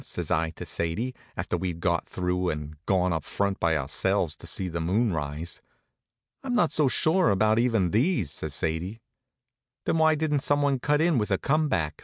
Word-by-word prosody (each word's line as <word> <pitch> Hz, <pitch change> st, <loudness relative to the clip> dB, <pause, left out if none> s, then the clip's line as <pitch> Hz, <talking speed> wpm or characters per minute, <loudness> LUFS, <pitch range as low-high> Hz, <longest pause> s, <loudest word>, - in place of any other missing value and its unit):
says -, -, -4 dB
I 80 Hz, +1 st, +2 dB
to -, -, -8 dB
Sadie, 105 Hz, +10 st, -2 dB, 0.2 s
after -, -, -2 dB
we'd 90 Hz, -1 st, -3 dB
got 85 Hz, -1 st, 0 dB
through 90 Hz, 0 st, -1 dB
and 75 Hz, 0 st, -4 dB
gone 90 Hz, -2 st, +2 dB
up 80 Hz, -2 st, -2 dB
front 100 Hz, -1 st, -1 dB
by 80 Hz, -2 st, +2 dB
ourselves 75 Hz, +4 st, 0 dB
to -, -, -10 dB
see 95 Hz, -, -1 dB
the 85 Hz, -1 st, -3 dB
moon 100 Hz, +6 st, +1 dB
rise. 75 Hz, +2 st, -4 dB, 0.8 s
"I'm 260 Hz, -3 st, -2 dB
not 170 Hz, -, +3 dB
so 150 Hz, -2 st, +2 dB
sure 160 Hz, -, +3 dB
about 110 Hz, +3 st, +3 dB
even 115 Hz, -8 st, +2 dB
these," 115 Hz, -, +1 dB
says 80 Hz, -2 st, -4 dB
Sadie. 85 Hz, +9 st, -2 dB, 0.9 s
"Then 165 Hz, -, +1 dB
why 160 Hz, 0 st, +5 dB
didn't 150 Hz, -1 st, 0 dB
someone 145 Hz, -1 st, +1 dB
cut 150 Hz, +3 st, +2 dB
in 165 Hz, -5 st, +3 dB
with 105 Hz, -, -1 dB
a 95 Hz, -, +2 dB
come 155 Hz, +6 st, +1 dB
back?" 80 Hz, -, -1 dB
95 Hz, 190 wpm, -27 LUFS, 85-140 Hz, 0.9 s, why